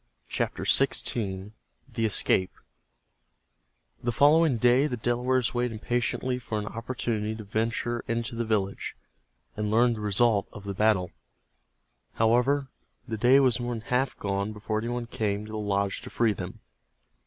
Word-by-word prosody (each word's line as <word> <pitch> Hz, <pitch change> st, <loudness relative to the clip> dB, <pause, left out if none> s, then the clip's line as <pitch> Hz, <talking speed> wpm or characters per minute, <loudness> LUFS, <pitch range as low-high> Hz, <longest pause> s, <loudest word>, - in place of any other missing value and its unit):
CHAPTER -, -, -2 dB
XVI—THE 105 Hz, +1 st, -1 dB
ESCAPE 95 Hz, -2 st, +2 dB, 1.5 s
The 120 Hz, -, 0 dB
following 145 Hz, +2 st, +4 dB
day 125 Hz, +5 st, +4 dB
the 125 Hz, -, -3 dB
Delawares 125 Hz, +1 st, +1 dB
waited 120 Hz, -1 st, 0 dB
impatiently 120 Hz, +3 st, -1 dB
for 110 Hz, -3 st, -4 dB
an 105 Hz, -, -3 dB
opportunity 115 Hz, -1 st, -3 dB
to 110 Hz, -, -8 dB
venture 115 Hz, +3 st, -1 dB
into 115 Hz, 0 st, -2 dB
the 115 Hz, 0 st, -1 dB
village, 105 Hz, -3 st, -1 dB, 0.6 s
and 105 Hz, 0 st, -2 dB
learn 120 Hz, +3 st, +4 dB
the 110 Hz, -, -6 dB
result 105 Hz, 0 st, +2 dB
of 105 Hz, -, -10 dB
the 100 Hz, -1 st, -4 dB
battle. 95 Hz, -3 st, +2 dB, 1.0 s
However, 125 Hz, +5 st, +2 dB, 0.4 s
the 115 Hz, -, -3 dB
day 125 Hz, +5 st, +6 dB
was 130 Hz, -3 st, +3 dB
more 120 Hz, 0 st, -2 dB
than 115 Hz, -, -6 dB
half 125 Hz, +3 st, 0 dB
gone 100 Hz, +1 st, -2 dB
before 110 Hz, +1 st, -2 dB
any 115 Hz, -, -4 dB
one 120 Hz, 0 st, -2 dB
came 105 Hz, -2 st, -2 dB
to 110 Hz, -, -10 dB
the 110 Hz, -, -4 dB
lodge 100 Hz, -1 st, -1 dB
to -, -, -8 dB
free 115 Hz, -2 st, +2 dB
them. -, -, -7 dB
115 Hz, 150 wpm, -27 LUFS, 105-120 Hz, 1.5 s, day